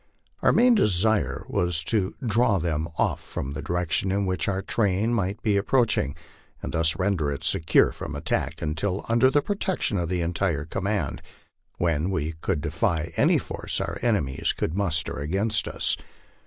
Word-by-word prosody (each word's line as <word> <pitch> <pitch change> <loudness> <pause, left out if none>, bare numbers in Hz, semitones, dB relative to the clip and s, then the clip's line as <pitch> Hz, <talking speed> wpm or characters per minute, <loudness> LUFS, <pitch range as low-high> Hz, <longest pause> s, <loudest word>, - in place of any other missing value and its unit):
Our - - +4
main 245 +1 +5
desire 110 - +2
was 85 -2 0
to 95 +2 0
draw 110 -2 +3
them 80 -2 -1
off - - +1
from 70 +1 -5
the 75 - -5
direction 90 +2 0
in 100 +1 0
which 95 -1 -1
our 95 -1 -1
train 105 +2 +1
might 100 -2 -1
be 105 -2 +2
approaching, 105 - +1 0.4
and - - -5
thus 80 0 +3
render 90 -6 0
it 70 - -5
secure 80 - +3
from - - -7
attack - - -2
until 90 +6 -2
under 120 +3 +4
the 145 +2 +2
protection 190 - 0
of 85 -2 -2
the 90 -1 0
entire 85 -3 -1
command, 95 -2 -2 0.6
when 85 0 0
we 80 -5 -1
could 85 -7 -1
defy 80 +1 -1
any - - +4
force - - -2
our - - -3
enemies, 100 - 0
could 80 - -2
muster 85 -7 -1
against 100 +9 0
us. - - 0
95 Hz, 165 wpm, -25 LUFS, 80-105 Hz, 0.6 s, main